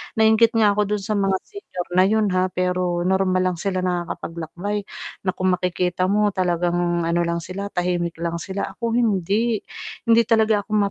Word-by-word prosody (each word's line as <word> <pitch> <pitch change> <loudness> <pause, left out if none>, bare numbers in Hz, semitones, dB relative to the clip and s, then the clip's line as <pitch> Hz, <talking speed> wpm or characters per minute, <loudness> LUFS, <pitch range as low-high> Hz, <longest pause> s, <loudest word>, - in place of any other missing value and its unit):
nainggit 220 +1 +4
nga 215 -2 +5
ako 210 0 +1
dun 205 - -4
sa 210 +2 -2
mga 195 -1 +2
senior 400 - -8
na 185 - +7
'yun 215 +1 +2
ha, 185 0 +2
pero 180 -1 0
normal 185 0 +2
lang - - -8
sila 185 +1 -2
nakakapaglakbay, 175 +2 -3 0.4
na 185 - +2
kung 185 0 0
makikita 180 0 0
mo 210 +1 +3
talagang 175 -1 0
ano 170 +1 +1
lang 170 0 -1
sila 195 +4 -5
tahimik 175 -1 -1
lang 170 0 -2
sila 190 +3 -4
ako 230 -1 -3
hindi, 215 0 +1 0.5
hindi 230 0 +5
talaga 220 -2 +3
ako - - -40
ma 200 -1 +3
185 Hz, 175 wpm, -22 LUFS, 175-210 Hz, 0.5 s, na